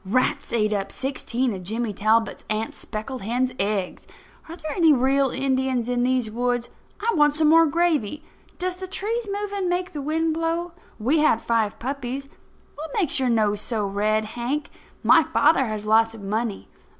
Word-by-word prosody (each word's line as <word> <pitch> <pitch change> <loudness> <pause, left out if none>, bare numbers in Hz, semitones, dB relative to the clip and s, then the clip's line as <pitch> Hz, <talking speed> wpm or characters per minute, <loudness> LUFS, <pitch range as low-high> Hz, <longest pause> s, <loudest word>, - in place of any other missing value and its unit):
Rats 230 +7 0
ate 215 -2 +1
up 200 -1 -2
sixteen 260 -2 -2
of 190 - -6
Jimmy 220 +4 -2
Talbot's 220 +3 +1
aunt's 215 +1 -2
speckled 230 +4 -6
hen's 245 +5 0
eggs. 200 -2 -2 0.4
Are 335 - -6
there 310 -3 -6
any 330 -1 +4
real 270 0 +3
Indians 260 -2 0
in 245 0 0
these 250 -3 +1
woods? 245 +1 -1 0.3
I 460 +2 0
want 295 -2 +4
some 310 -1 +3
more 330 +1 +6
gravy. 305 -4 0 0.3
Does 365 0 -3
the 375 0 -6
trees 440 +4 -2
moving 400 -2 -2
make 360 +1 -1
the 295 - -5
wind 320 +3 0
blow? 330 +2 -1 0.3
We 265 +9 +2
had 300 -7 +4
five 225 -3 0
puppies. 275 +1 -4 0.4
What 315 +2 -7
makes 335 -9 +2
your 260 -2 +1
nose 210 -3 +1
so 220 -3 -2
red, 210 +2 0
Hank? 245 +7 -3 0.3
My - - +7
father 270 -5 +3
has 215 -1 -4
lots 225 +1 +3
of 220 - -10
money. 215 +1 -2
255 Hz, 175 wpm, -24 LUFS, 220-310 Hz, 0.4 s, My